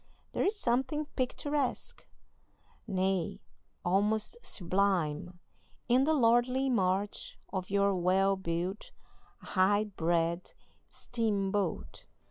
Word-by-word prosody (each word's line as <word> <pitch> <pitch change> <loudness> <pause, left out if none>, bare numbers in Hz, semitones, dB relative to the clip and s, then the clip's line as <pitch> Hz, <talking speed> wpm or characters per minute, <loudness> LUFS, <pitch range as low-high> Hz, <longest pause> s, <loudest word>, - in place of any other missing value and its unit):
There - - 0
is 415 - +1
something 265 +1 0
picturesque, 280 +1 -2 0.8
nay, 190 -3 0 0.5
almost 210 - +1
sublime, 180 - 0 0.5
in 255 +2 +4
the 315 - +3
lordly 250 +1 +3
march 195 -2 0 0.2
of 185 -2 -3
your 200 0 +3
well 190 +2 +3
built, 180 +2 -3 0.5
high 205 +2 +2
bred 170 -3 -1 0.4
steamboat. 205 -5 -2
200 Hz, 90 wpm, -31 LUFS, 185-240 Hz, 0.8 s, in